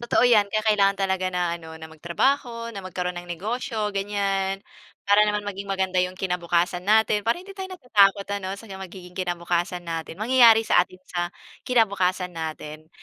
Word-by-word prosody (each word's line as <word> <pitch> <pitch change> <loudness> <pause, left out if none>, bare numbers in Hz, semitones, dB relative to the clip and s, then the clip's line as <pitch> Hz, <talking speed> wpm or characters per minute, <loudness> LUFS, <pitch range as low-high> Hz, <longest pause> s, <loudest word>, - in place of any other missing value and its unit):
Totoo 240 +1 +2
yan, 215 -4 +5
kaya 215 0 -1
kailangan 200 -2 +4
talaga 190 -1 0
na 175 -1 -1
ano, 160 -1 -10
na 160 - -9
magtrabaho, 230 - -1
na 195 - -5
magkaroon 180 -1 -4
ng 175 0 -8
negosyo, 215 +3 -3
ganyan. 195 -1 -1 0.5
Para 205 +1 +5
naman 210 0 -1
maging 200 0 -6
maganda 190 -1 0
'yong 180 0 -2
kinabukasan 175 -1 0
natin, 215 +1 +3
para 230 +7 0
hindi 390 +2 -11
tayo 380 -1 -6
natatakot 200 - +3
ano, 195 0 -4
sa 225 - -12 0.2
magiging 180 -1 -10
kinabukasan 175 0 -2
natin, 165 0 -5
mangyayari 230 -1 +6
sa 175 - +4
atin 185 +1 -12
sa 175 -1 -3 0.3
kinabukasan 190 -6 +1
natin. 155 -1 -6
195 Hz, 165 wpm, -24 LUFS, 175-215 Hz, 0.5 s, mangyayari